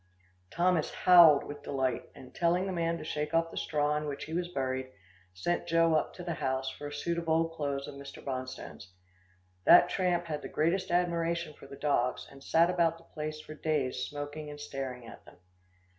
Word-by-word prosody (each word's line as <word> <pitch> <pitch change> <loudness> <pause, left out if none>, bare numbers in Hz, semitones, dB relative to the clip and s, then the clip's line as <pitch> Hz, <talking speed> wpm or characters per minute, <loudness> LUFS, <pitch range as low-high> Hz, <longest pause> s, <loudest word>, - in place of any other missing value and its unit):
Thomas 175 - +1
howled 170 -5 +7
with 145 0 -8
delight, 130 -3 -2
and 130 - -13
telling 175 +2 +1
the 195 - -2
man 170 -1 0
to 155 - -8
shake 150 0 -3
off 165 0 +2
the - - -10
straw 150 -1 0
in 150 - -3
which 140 -1 -4
he 160 - -7
was 175 +1 -1
buried, 130 -5 -2
he - - -22 0.4
sent 175 - -1
Joe 165 -1 +3
up 155 - +1
to 180 - -8
the 175 -1 -2
house 130 -2 -2
for 145 - -8
a - - -7
suit 170 +4 -2
of 165 -1 -5
old 165 +1 +2
clothes 140 -3 -3
of 145 - -7
Mr. 140 0 -10
Bonstone's. 130 -7 -6 0.7
That 175 0 +8
tramp 180 -2 0
had 150 -3 -4
the - - -7
greatest 180 +5 0
admiration 170 -2 0
for 140 - -14
the 140 - -10
dogs, 135 -4 0
and 135 0 -14
sat 170 +2 +4
about 170 -2 +2
the 165 - -18
place 155 0 -4
for 155 - -10
days 150 -4 -1
smoking 145 +1 -6
and 145 0 -9
staring 135 -4 -5
at - - -12
them. - - -16
155 Hz, 205 wpm, -30 LUFS, 140-170 Hz, 0.7 s, That